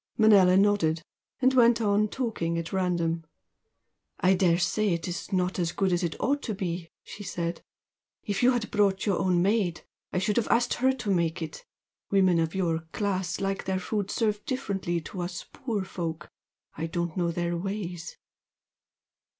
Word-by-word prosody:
Manella 200 -5 +6
nodded, 190 -6 +3 0.4
and 260 0 +4
went 235 -2 +5
on 210 -1 +2
talking 210 -9 -2
at 165 +2 -4
random. 170 -3 0 1.0
"I 185 +2 +4
daresay 180 +2 +2
it's 175 +2 -5
not 185 0 0
as 170 -2 0
good 190 -2 +1
as 175 - +1
it 170 -3 -3
ought 285 +1 +1
to 220 - -3
be" 175 -3 -4
she 205 - -10
said 170 -3 -3 0.6
"If 205 -2 -2
you 245 - +6
had 235 -3 -2
brought 200 -2 +2
your 200 -4 +1
own 180 -2 +2
maid 195 -4 +1 0.3
I - - -2
should 200 +4 +1
have 235 - +2
asked 235 +1 +2
HER 260 +1 +3
to 245 -6 -3
make 170 -1 0
it. 155 -1 -7 0.5
Women 185 -3 +4
of 165 +1 -1
your 170 -4 +1
class 190 -4 -1
like 195 0 -2
their 190 -1 0
food 200 +1 -2
served 210 -2 0
differently 195 -9 -2
to 180 +3 -6
us 175 -1 -5
poor 220 -7 -2
folk, 170 -3 -5 0.4
and 160 - -3
I - - -3
don't 170 0 -3
know 175 -2 +1
their 175 0 -1
ways." 180 -2 -5
185 Hz, 170 wpm, -27 LUFS, 170-210 Hz, 1.0 s, Manella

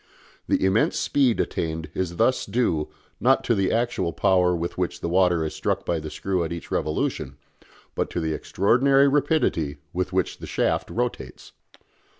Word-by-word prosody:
The - - +2
immense 95 +4 +2
speed 130 -5 +2
attained 80 -1 -2
is 90 -2 -3
thus 130 +9 +1
due, 100 -8 0 0.3
not 135 +2 +3
to 120 - +2
the 95 -3 +1
actual 115 -7 0
power 90 0 +3
with 85 +1 -3
which 90 -1 -2
the - - -3
water 90 -2 +2
is 75 - -4
struck - - -2
by 85 - 0
the 75 0 -6
screw 90 +3 -2
at 80 - -4
each 85 -1 -7
revolution, 70 -3 -2 0.6
but - - -2
to - - -3
the 80 -1 -1
extraordinary 135 - +3
rapidity 135 - +1 0.2
with 90 +1 -2
which 95 -1 -1
the - - -8
shaft - - 0
rotates. 120 - -4
90 Hz, 165 wpm, -24 LUFS, 80-120 Hz, 0.6 s, not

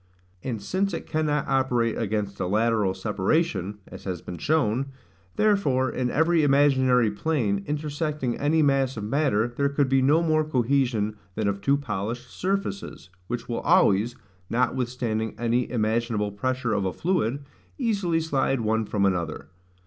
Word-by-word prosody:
And 120 -4 -3
since 185 - -1
it - - -6
cannot 150 -2 0
operate 125 -4 +1
against 105 -2 -2
a - - -1
lateral 105 -1 +1
separation, 105 - 0
(as - - -11
has 90 -3 -3
been 90 - -7
shown,) 140 -4 +1 0.5
therefore 140 - +2
in 125 -1 -1
every 160 +4 +3
imaginary 130 -5 +4
plane, 105 -5 -1
intersecting 150 -3 -2
any 155 +2 +2
mass 135 -3 +2
of 105 - -4
matter, 120 -2 +1
there 140 +1 +1
could 140 -1 +1
be 135 0 +3
no 150 +6 +4
more 155 -1 +2
cohesion 125 -6 0 0.2
than 110 -1 -1
of 100 0 -1
two 140 +6 +3
polished 120 -1 -4
surfaces, 195 - -3 0.2
which 120 -1 -4
will 120 - -2
always, 120 - +3 0.3
notwithstanding 120 -2 -1
any 120 +1 0
imaginable 110 -2 0
pressure 125 +3 -1
of 100 -2 0
a 95 -1 -1
fluid, 145 -7 -1 0.3
easily 200 - 0
slide 135 -5 0
one 110 0 0
from 100 -1 0
another. 85 -5 -2
125 Hz, 150 wpm, -25 LUFS, 110-145 Hz, 0.5 s, imaginary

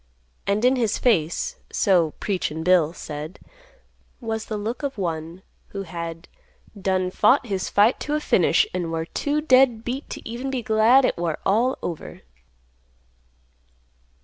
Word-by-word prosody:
And 205 +4 +1
in 260 +1 +4
his 225 -4 0
face, 230 - +1
so 175 -6 +2
"Preachin' 170 -5 -2
Bill" 175 -3 +4
said, 155 +1 -7 0.8
was 220 -2 -4
the 215 - -4
look 220 +6 -4
of 275 -4 -4
one 165 -1 -4 0.2
who 195 -1 -6
had 165 -1 -7 0.5
"done 185 -2 -1
fought 230 +8 +3
his 195 -5 -3
fight 210 +5 +3
to 295 - -2
a - - +1
finish, 305 - +3
an' 175 -2 -2
war 165 0 -2
too 290 - -1
dead 255 -6 +4
beat 260 +4 -5
t' - - -7
even 240 +4 -5
be 260 -3 -3
glad 225 +5 +5
it - - -1
war 165 -3 -1
all 235 +6 +2
over." 165 -3 -6
205 Hz, 150 wpm, -23 LUFS, 170-250 Hz, 0.8 s, glad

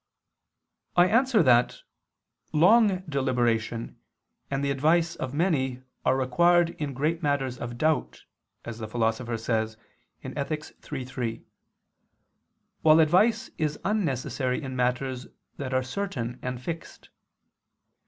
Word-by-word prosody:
I 175 - +6
answer 230 0 +3
that, 125 -3 +4 0.7
Long 195 +4 +5
deliberation 120 -5 -1 0.5
and 135 0 -1
the 140 - +1
advice 160 +5 +2
of 130 - -4
many 135 -5 0 0.2
are 130 +1 +2
required 170 +6 +3
in 140 -3 -3
great 155 +5 0
matters 135 -4 -1
of 120 0 -6
doubt, 155 +3 0 0.4
as 115 -1 -7
the 110 - -5
Philosopher 115 +1 -1
says 110 -1 -1 0.5
(Ethic. 150 +1 -3 0.3
iii, 135 -3 -3
3); 120 -3 -4 1.4
while 155 0 +6
advice 200 +9 +3
is 150 -2 0
unnecessary 135 - -1
in 135 -4 -6
matters 125 0 -1 0.3
that 135 -2 -4
are 130 0 +1
certain 130 -5 -4
and 125 -1 -4
fixed. 165 +2 -7
135 Hz, 115 wpm, -27 LUFS, 125-165 Hz, 1.4 s, I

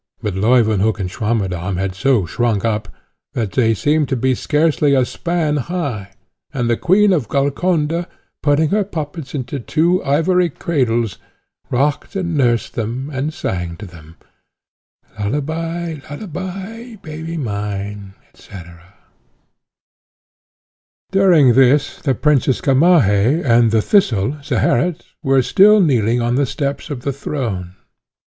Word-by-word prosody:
But 105 - -2
Leuwenhock 110 0 +2
and 90 -2 -3
Swammerdamm 95 -5 -2
had 95 0 -2
so 115 0 +1
shrunk 115 +2 -1
up, 110 -1 -1 0.5
that 115 -7 -2
they 115 -3 +2
seemed 150 +5 +1
to - - 0
be 130 +2 +1
scarcely 150 +1 +1
a 130 -2 +3
span 165 0 -1
high, 130 - -4 0.4
and 125 -4 -2
the 120 - +2
Queen 195 - +3
of 145 - 0
Golconda, 155 - 0 0.3
putting 150 +1 +2
her 210 +1 +1
puppets 155 -5 -6
into 135 +1 -4
two 170 +9 +1
ivory 175 +5 +2
cradles, 120 - -1 0.5
rocked 140 +9 -1
and 175 -4 -2
nursed 120 -5 +1
them, 120 +6 -4
and 135 +4 -2
sang 90 - -4
to 105 - -9
them, 80 -3 -14 1.0
Lullaby, 160 +8 -3
lullaby, 195 +8 -7
baby 160 +1 -6
mine, 100 -4 -5 0.2
&c. - - -20 2.6
During 175 -10 +5
this 135 +3 +3
the 135 -4 0
Princess 140 -2 +2
Gamaheh 135 - +3
and 115 -2 +4
the 110 -1 +2
Thistle, 135 - +2
Zeherit, 160 +4 0 0.2
were 135 -3 +2
still 205 - +5
kneeling 120 - +2
on 120 +1 0
the 140 -1 +1
steps 140 +4 -3
of 140 -5 -5
the 140 +2 -2
throne. 110 -11 -4
135 Hz, 125 wpm, -18 LUFS, 110-160 Hz, 2.6 s, During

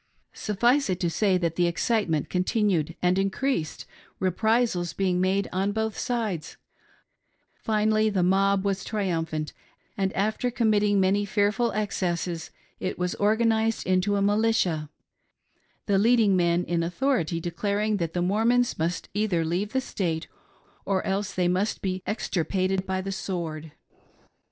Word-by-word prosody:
Suffice 240 +6 +1
it 185 -1 -1
to 170 -2 +1
say, 190 +2 +2
that 170 -2 -2
the 175 -1 +3
excitement 170 - 0
continued 180 -4 0
and 180 +1 +3
increased, 195 - -1 0.3
reprisals 190 -1 +1
being 185 -2 0
made 190 +1 +1
on 195 +2 0
both 220 0 -1
sides; 220 -10 -3 1.0
finally 215 0 +1
the 190 -4 +1
mob 195 +2 +2
was 195 -1 -1
triumphant, 165 -7 -2 0.4
and 195 -1 0
after 215 +5 0
committing 210 -4 +2
many 195 +2 +2
fearful 210 +3 +1
excesses 180 -5 -2 0.3
it 185 - -3
was 180 0 -1
organised 220 +1 +2
into 185 +2 +2
a 200 - +1
militia 205 -7 +1 0.5
— - - -43
the 200 -2 +2
leading 220 -2 +4
men 175 -1 +2
in 170 -1 -1
authority 175 - 0
declaring 200 +5 -1
that 165 -3 -3
the 175 - 0
Mor 200 +5 +1
mons 245 -2 +2
mUst 165 +1 -2
either 200 -5 0
leave 180 +6 -1
the 265 - +1
State 170 -9 -2 0.6
or 190 -2 -1
else 195 0 -1
they 180 -1 0
must 185 +5 0
be 185 -1 -3
extir 195 -5 -1
pated 190 +1 -1
by 190 0 -1
the 195 +1 -4
sword. 165 -5 -4
195 Hz, 145 wpm, -26 LUFS, 175-215 Hz, 1.0 s, leading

